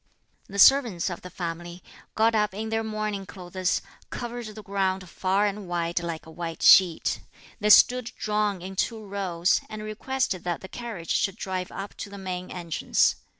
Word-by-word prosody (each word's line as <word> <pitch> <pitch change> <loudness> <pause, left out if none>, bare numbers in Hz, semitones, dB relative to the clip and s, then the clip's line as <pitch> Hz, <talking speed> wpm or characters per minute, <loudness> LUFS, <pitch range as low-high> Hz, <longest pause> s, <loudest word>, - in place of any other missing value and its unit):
The 200 - -7
servants 220 -6 +5
of 175 - -6
the 180 - -9
family, 175 0 -6 0.3
got 225 +1 +4
up 210 -3 +1
in 220 +2 -4
their 225 0 0
mourning 215 -3 -3
clothes, 185 -1 -2 0.3
covered 240 -1 -5
the 215 0 -9
ground 190 -2 -1
far 190 +3 +1
and 205 -1 -3
wide 170 0 -1
like 170 -2 -5
a 160 - -12
white 165 0 -5
sheet. 180 -4 +6 0.4
They 210 -1 +1
stood 250 +3 +7
drawn 210 -3 0
in 190 +1 -7
two 220 +2 -1
rows, 190 -3 +1
and 215 0 -6
requested 215 -2 -2
that 175 -1 -2
the 190 - -9
carriage 225 -9 -6
should 195 -2 +1
drive 185 -4 -4
up 195 +1 -6
to - - -6
the 200 - -9
main 185 -1 -5
entrance. 170 -3 +1
195 Hz, 175 wpm, -26 LUFS, 180-215 Hz, 0.4 s, stood